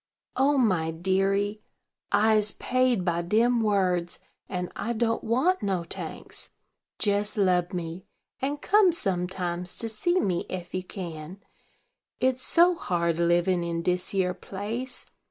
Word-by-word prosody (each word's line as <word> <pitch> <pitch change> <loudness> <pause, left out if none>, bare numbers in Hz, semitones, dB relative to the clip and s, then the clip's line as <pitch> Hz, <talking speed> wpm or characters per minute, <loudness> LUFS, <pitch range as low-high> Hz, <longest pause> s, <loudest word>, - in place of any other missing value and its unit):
"O 275 +2 +3
my 185 -10 +2
deary! 195 +5 0 0.5
I'se 210 0 +3
paid 255 -6 +1
by 170 -1 +1
dem 230 +7 +2
words, 185 -5 +1 0.3
and 180 -2 -3
I 235 - -2
don't 230 0 0
want 265 +11 +2
no 190 -4 0
tanks. 170 - -6 0.5
Jes 205 0 0
lub 180 -3 +2
me, 175 -1 -5 0.3
and 285 +2 -2
come 410 -2 +5
sometimes 180 - -2
to 230 - -2
see 345 +12 +1
me 180 - -1
ef 175 -2 -6
you 185 - -2
can, 175 -1 -7 0.8
it's 255 0 +1
so 345 +6 +4
hard 170 - -1
livin' 175 +1 +2
in 170 0 -2
dis 180 +1 0
yere 185 -2 +1
place. 220 +7 -5
195 Hz, 135 wpm, -27 LUFS, 175-230 Hz, 0.8 s, come